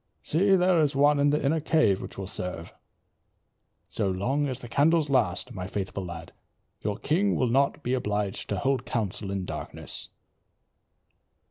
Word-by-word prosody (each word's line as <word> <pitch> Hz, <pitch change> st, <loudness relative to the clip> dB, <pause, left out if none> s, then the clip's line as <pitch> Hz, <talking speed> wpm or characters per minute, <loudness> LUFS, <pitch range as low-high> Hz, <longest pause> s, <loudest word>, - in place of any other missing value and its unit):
"See, 195 Hz, +5 st, +3 dB
there 180 Hz, -1 st, +4 dB
is 145 Hz, -2 st, +1 dB
one 145 Hz, +1 st, +4 dB
in 145 Hz, 0 st, +4 dB
the 150 Hz, 0 st, +1 dB
inner 160 Hz, +4 st, +2 dB
cave 155 Hz, -, +2 dB
which -, -, -8 dB
will 95 Hz, -, -4 dB
serve. 90 Hz, -2 st, -5 dB, 1.1 s
So 100 Hz, -3 st, -1 dB
long 130 Hz, +11 st, 0 dB
as 130 Hz, -2 st, -2 dB
the 125 Hz, -, -9 dB
candles 150 Hz, +3 st, +2 dB
last, 105 Hz, -9 st, +1 dB
my 90 Hz, -1 st, -5 dB
faithful 95 Hz, 0 st, -4 dB
lad, 85 Hz, -2 st, -8 dB, 0.5 s
your 105 Hz, -1 st, -2 dB
king 195 Hz, +7 st, +1 dB
will 125 Hz, -, +1 dB
not 140 Hz, +3 st, +2 dB
be 125 Hz, -, -1 dB
obliged 105 Hz, -5 st, -2 dB
to -, -, -1 dB
hold 135 Hz, -2 st, 0 dB
council 105 Hz, -3 st, -2 dB
in 95 Hz, -1 st, -2 dB
darkness." -, -, -5 dB
130 Hz, 160 wpm, -27 LUFS, 100-145 Hz, 1.1 s, there